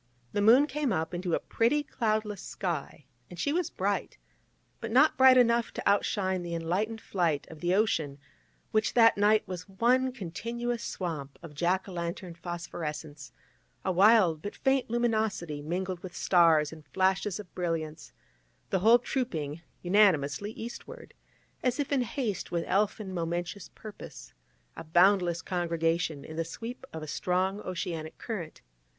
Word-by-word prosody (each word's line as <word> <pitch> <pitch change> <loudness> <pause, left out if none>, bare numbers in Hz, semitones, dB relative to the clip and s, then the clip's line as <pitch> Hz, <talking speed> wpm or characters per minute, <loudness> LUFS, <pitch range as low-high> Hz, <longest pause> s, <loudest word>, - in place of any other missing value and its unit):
The 205 - 0
moon 240 +7 +7
came 295 -3 -1
up 160 -2 -1
into 175 -1 -1
a - - -1
pretty 290 +6 +1
cloudless 215 -6 -1
sky, 160 -6 -4 0.2
and 175 - -10
she 285 - 0
was 345 -1 0
bright, - - -2 0.6
but 230 - -5
not 270 +7 +5
bright 260 -1 +7
enough 235 -1 +3
to - - -4
out 200 0 +4
shine 190 -2 -1
the 170 -1 -4
enlightened 190 +7 -1
flight 170 -9 -1
of 160 - -11
the 175 +2 +1
ocean, 160 -9 +1 0.5
which 215 0 +1
that 230 -1 +7
night 210 +1 +3
was 180 +1 -7
one 250 +6 +2
continuous 235 +3 -4
swamp 155 -10 -5
of 165 -3 -9
Jack 175 +6 0
o' - - -8
lantern 170 0 -4
phosphorescence, 160 -4 -6 0.5
a 190 - +2
wild 185 -4 +5
but 205 - -6
faint 265 -2 +1
luminosity 220 -10 0
mingled 180 +4 -3
with 180 -2 -9
stars 160 -4 +4
and 155 -1 -12
flashes 190 +1 +1
of 200 -4 -10
brilliance, 160 -4 -3 0.6
the 190 - +2
whole 225 +6 +7
trooping 165 - -3 0.2
unanimously 180 -3 +3
eastward, 355 - -9 0.5
as 250 +2 0
if 290 0 -2
in 275 -2 +3
haste 235 -4 -3
with 170 -1 0
elfin 200 -1 0
momentous 175 +2 -3
purpose, 210 - -10 0.4
a - - -7
boundless 175 +1 +3
congregation, 165 -4 -1
in 160 - -8
the 165 - +1
sweep 230 +10 -8
of 160 -1 -6
a - - -7
strong 185 +6 0
oceanic 170 -4 -5
current. 185 -9 -6
185 Hz, 155 wpm, -29 LUFS, 165-225 Hz, 0.6 s, moon